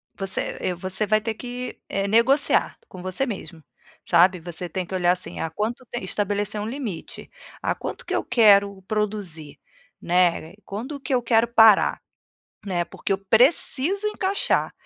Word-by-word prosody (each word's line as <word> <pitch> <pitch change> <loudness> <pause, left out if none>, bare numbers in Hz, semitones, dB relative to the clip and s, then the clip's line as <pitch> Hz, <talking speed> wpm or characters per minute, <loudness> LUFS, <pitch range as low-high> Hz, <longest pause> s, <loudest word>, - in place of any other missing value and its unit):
Você, 195 -1 0
eh, 185 - -1
você 190 +4 0
vai 215 +1 +3
ter 220 +1 -3
que, 245 +2 -7
eh, 195 0 -1
negociar 235 +7 +3
com 185 - -11
você 185 +8 -1
mesmo, 190 - -7 0.4
sabe. 180 +2 +4
Você 175 +1 -5
tem 185 +3 -3
que 180 - -10
olhar, 180 -1 +2
assim: 180 0 -4
ah, 165 - -2
quanto 215 +9 -4
te 240 - -4
estabelecer 205 +2 -2
um 210 - -4
limite: 230 - -6 0.3
"Ah, - - 0
quanto - - -7
que - - -4
eu - - 0
quero 200 -5 +4
produzir, 190 -8 -3 0.4
né? 175 -2 +1
Quando 250 +9 -6
que 270 0 -4
eu 245 - +1
quero 230 0 +2
parar, 225 -3 +5 0.7
né? 180 -4 -1
Porque 195 - -4
eu 195 - 0
preciso 265 - +2
encaixar". 400 -2 -1
205 Hz, 160 wpm, -23 LUFS, 185-235 Hz, 0.7 s, parar